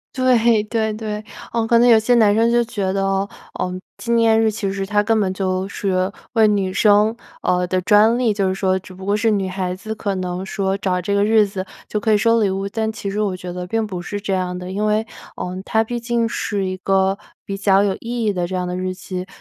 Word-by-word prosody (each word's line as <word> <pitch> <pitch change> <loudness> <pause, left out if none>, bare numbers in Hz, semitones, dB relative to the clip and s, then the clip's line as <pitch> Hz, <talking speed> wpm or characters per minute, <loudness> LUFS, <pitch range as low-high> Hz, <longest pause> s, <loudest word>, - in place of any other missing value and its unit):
对， 235 -4 +3
对， 220 0 -1
对， 215 -1 -5 0.3
嗯， 230 -1 0
可 235 - +4
能 240 +1 +5
有 225 -2 +7
些 245 +3 +2
男 210 -3 +5
生 230 +2 +3
就 240 0 +3
觉 200 -5 -2
得， 195 0 0 0.3
嗯， 185 0 -2 0.2
纪 235 - -4
念 225 -1 +4
日 220 - +3
其 205 -2 -3
实 195 0 -3
它 205 +1 +1
根 225 0 +2
本 190 -3 +1
就 185 0 -1
是 190 -1 -1 0.2
为 220 -2 +5
女 195 -3 0
生 210 +2 +4 0.3
呃， 180 0 +1
的 185 +1 0
专 215 +4 +5
利， 235 -4 +2
就 200 -2 0
是 185 - -1
说 190 -1 +1
只 185 0 -13
不 190 +1 -10
过 205 +1 +1
是 225 +2 +2
女 200 -3 0
孩 185 -1 -3
子 215 +4 -6
可 200 -2 -3
能 180 0 -3
说 195 0 -1
找 185 -2 -1
这 200 +3 -2
个 200 - +3
日 215 0 +4
子 190 -1 -5 0.2
就 210 - -2
可 220 +1 0
以 - - +5
收 230 +2 +3
礼 205 - +2
物。 195 +1 -2
但 220 +2 -2
其 205 -2 -5
实 210 +2 -1
我 190 -3 -1
觉 180 -1 -7
得 180 0 -5
并 225 +3 0
不 185 -4 -5
是 205 +3 -5
这 200 -1 -3
样 180 -1 -1
的， 180 +1 -7
因 205 +2 -1
为， 215 +1 +1 0.3
嗯， 180 +1 -4
它 220 +1 +1
毕 240 +2 -4
竟 235 -1 0
是 205 -3 -2
一 185 0 -3
个 195 +1 +1 0.3
比 195 - -4
较 195 0 +3
有 195 -2 +1
意 235 0 -3
义 210 -2 +1
的 175 -1 -1
这 185 - -4
样 180 -1 -2
的 180 - -3
日 185 0 -2
期。 185 0 -6
200 Hz, 270 characters per minute, -20 LUFS, 185-220 Hz, 0.3 s, 有